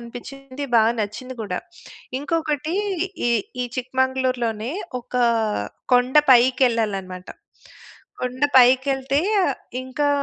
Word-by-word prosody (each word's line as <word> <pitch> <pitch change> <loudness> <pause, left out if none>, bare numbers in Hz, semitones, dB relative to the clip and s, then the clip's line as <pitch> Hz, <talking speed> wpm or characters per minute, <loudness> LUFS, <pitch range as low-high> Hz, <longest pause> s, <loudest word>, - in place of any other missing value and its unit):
అనిపిచ్చింది. 270 +3 -8
బా 225 - +7 0.2
నచ్చింది 245 +5 -5
గూడా. 190 -4 -3 0.6
ఇంకొకటి 310 +1 -2 0.5
ఈ - - +2 0.3
ఈ - - -1
చిక్‌మంగళూరు‌లోనే 255 -2 -1 0.3
ఒక 245 - -21 0.8
కొండ 245 +1 +2 0.2
పైకి 255 +1 +5
ఎళ్ళాలనమాట. 195 -5 -3 0.9
కొండ 255 +2 -4 0.2
పైకెళ్తే 265 +2 +3 0.6
ఇంకా 285 +3 -1
255 Hz, 90 wpm, -22 LUFS, 235-270 Hz, 0.9 s, బా